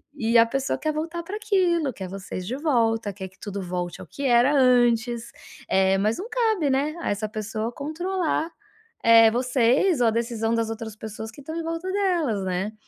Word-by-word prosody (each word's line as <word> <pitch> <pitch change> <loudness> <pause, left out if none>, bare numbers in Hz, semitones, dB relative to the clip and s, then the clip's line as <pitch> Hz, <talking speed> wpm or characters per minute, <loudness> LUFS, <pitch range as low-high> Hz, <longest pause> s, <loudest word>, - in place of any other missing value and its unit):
E 230 -3 +2
a 230 - +7
pessoa 270 +3 -2
quer 310 - -1
voltar 330 +3 -4
pra 390 +5 -5
aquilo, 360 - +1
quer 190 -3 -7
vocês 190 -1 -6
de 245 - -2
volta, 230 -8 +1
quer 190 -1 -7
que 190 - -27
tudo 200 -2 -5
volte 180 -1 -4
ao - - -9
que 280 - -6
era 245 +2 +4
antes, 240 -2 +3 0.4
eh, 190 0 +3
mas 215 +3 +1
não 395 - -5
cabe, 440 - +1
né, 280 +4 0
a - - -2
essa 210 +1 -2
pessoa 215 +1 -4
controlar, 330 +4 -2 0.5
eh, 225 -1 +7
vocês 255 - +2
ou 240 - +4
a - - +3
decisão 230 0 -1
das 230 -1 -1
outras 225 -1 -6
pessoas 220 +1 -7
que 235 - -15
estão 315 +4 -7
em 335 - -3
volta 330 +3 -3
delas, 345 - 0
né? 190 +3 -2
240 Hz, 195 wpm, -24 LUFS, 220-315 Hz, 0.5 s, a